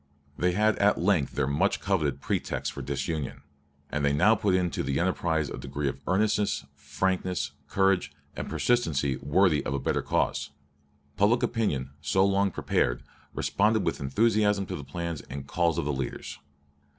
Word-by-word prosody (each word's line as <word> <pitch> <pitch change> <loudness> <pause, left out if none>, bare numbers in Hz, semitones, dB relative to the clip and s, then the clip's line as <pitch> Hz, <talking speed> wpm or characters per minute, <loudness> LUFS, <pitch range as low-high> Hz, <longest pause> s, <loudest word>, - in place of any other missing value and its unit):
They 90 +3 +1
had 110 +3 +2
at 105 0 +3
length 85 -6 +1
their - - +1
much 70 +2 +1
coveted 75 -9 0
pretext - - -2
for 70 - -6
disunion; 70 +2 -3 0.5
and 75 -1 -1
they 70 0 +3
now 95 +10 +5
put 100 -3 +1
into 90 -2 0
the 70 0 -1
enterprise 85 -3 0
a - - -6
degree 70 +2 -3
of 65 0 -4
earnestness, 105 +2 +1
frankness, 90 +5 -2 0.2
courage, 95 -1 +2 0.2
and - - -5
persistency 70 - +1
worthy 75 +3 +2
of 70 - -2
a - - -1
better - - 0
cause. - - 0 0.7
Public 110 +4 +3
opinion, 70 - -1
so 95 +6 +3
long 100 0 +2
prepared, - - 0 0.3
responded 105 +1 +2
with - - -1
enthusiasm 105 +7 +2
to - - -5
the 70 - -6
plans 85 +3 -4
and 65 +1 -6
calls 85 +2 +1
of - - -1
the 75 - 0
leaders. 65 -2 -5
85 Hz, 165 wpm, -28 LUFS, 70-100 Hz, 0.7 s, now